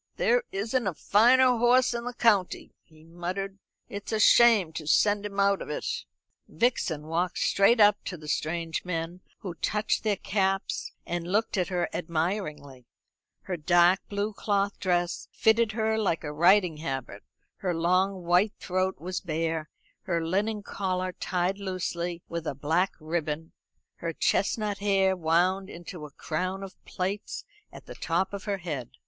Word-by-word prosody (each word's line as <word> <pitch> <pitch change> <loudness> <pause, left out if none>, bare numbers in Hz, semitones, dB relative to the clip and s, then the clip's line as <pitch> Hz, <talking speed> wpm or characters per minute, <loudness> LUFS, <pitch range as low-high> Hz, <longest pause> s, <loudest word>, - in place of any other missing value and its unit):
"There - - +3
isn't 225 +4 -1
a 180 - -2
finer 245 +7 +5
horse 245 +1 +4
in 235 0 -4
the 245 0 -5
county," 205 -7 +1
he 155 -1 -21
muttered; 185 +4 -5 0.3
"it's 200 0 -7
a 220 - 0
shame 215 -6 +6
to 155 -2 -6
send 205 +5 +3
him 200 -1 -6
out 200 0 +3
of - - -7
it." - - -4 0.6
Vixen 180 -10 0
walked 170 +3 -1
straight 210 +4 +3
up 205 -1 +5
to 180 - -5
the 155 -1 -12
strange 165 +2 -2
men, 170 0 -4 0.2
who 185 -4 -5
touched 210 +6 -1
their 215 -2 +2
caps, 195 0 -1
and 175 0 -3
looked 215 +3 +1
at 180 -3 0
her 180 -2 -1
admiringly; 155 - -3 0.6
her 185 - -3
dark 175 +3 +4
blue 205 +1 -2
cloth 200 0 -1
dress 175 -2 0
fitted 220 -1 +3
her 220 0 0
like 180 -7 0
a 150 -1 -4
riding 175 +1 +4
habit, 135 -9 -5 0.4
her 180 -3 -2
long 185 +3 +1
white 180 +5 +3
throat 185 +1 -1
was 180 +3 -4
bare, 160 -2 -2 0.4
her 170 -2 -1
linen 205 +5 -1
collar 185 -2 -2
tied 180 +2 -2
loosely 175 -3 -3
with 170 -1 -5
a - - -2
black 160 +7 +1
ribbon, 160 0 -3 0.5
her 165 -1 -4
chestnut 205 +4 0
hair 195 -2 +2
wound 180 +3 +1
into 170 -3 -8
a - - -19
crown 185 +4 -3
of 190 -1 -8
plaits 195 +3 -4 0.3
at - - -12
the - - -9
top 185 +4 -1
of 200 - -6
her 200 -2 -1
head. 150 -9 -5
185 Hz, 160 wpm, -27 LUFS, 170-205 Hz, 0.6 s, shame